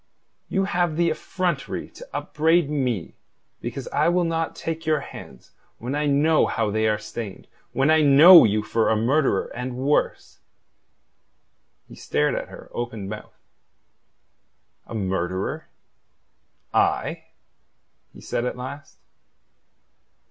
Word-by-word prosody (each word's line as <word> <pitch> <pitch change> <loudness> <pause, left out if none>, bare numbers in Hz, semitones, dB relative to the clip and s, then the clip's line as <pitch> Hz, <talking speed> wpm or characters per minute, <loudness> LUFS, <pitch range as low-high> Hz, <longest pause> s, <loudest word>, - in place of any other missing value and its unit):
"You 195 - 0
have 175 -4 0
the 170 -1 +2
effrontery 175 -2 -3
to - - -13
upbraid 160 0 +1
me 125 - -2 0.5
because - - -5
I - - +2
will 175 +1 +2
not 165 -1 -2
take 165 0 -5
your 155 -1 +2
hands 65 -2 -12 0.3
when 125 +4 -5
I 150 +1 0
know 150 +3 +3
how 110 -2 -1
they 110 +1 +1
are 105 -1 +1
stained; 105 -1 -8 0.2
when 135 +3 +2
I 160 0 +5
know 155 +5 +9
you 105 -1 +1
for 115 +1 0
a 110 - +3
murderer 130 +7 +1
and 125 +1 -5
worse?" 140 +3 -1 1.5
He - - -14
stared 75 - 0
at - - -3
her - - -12
open 115 -4 -5
mouthed. 110 0 -9 1.5
"A - - -7
murderer 95 -2 -2 1.1
I?" - - 0 0.9
he - - -15
said 120 - -3
at 125 - -3
last. 140 +3 -8
140 Hz, 125 wpm, -23 LUFS, 110-160 Hz, 1.5 s, know